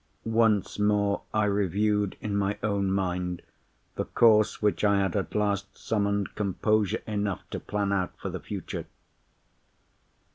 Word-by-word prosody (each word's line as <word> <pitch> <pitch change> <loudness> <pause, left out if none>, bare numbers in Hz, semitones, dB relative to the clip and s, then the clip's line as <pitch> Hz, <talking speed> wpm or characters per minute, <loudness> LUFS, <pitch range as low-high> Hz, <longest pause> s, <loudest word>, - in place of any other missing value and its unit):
Once 110 -3 +2
more, 105 -1 +2
I 110 -1 +2
reviewed 105 0 +1
in 105 -1 -2
my 100 0 0
own 100 -2 +1
mind 90 -2 -1 0.5
the - - -2
course 110 -2 +4
which 105 0 +1
I 100 -1 +4
had 95 -3 0
at 100 - -2
last 100 -1 -1
summoned 100 -2 -1
composure 105 0 0
enough 105 -3 -2
to - - -3
plan 100 -1 -2
out 95 -2 -1
for - - -4
the - - -4
future. - - -6
100 Hz, 140 wpm, -27 LUFS, 100-105 Hz, 0.5 s, course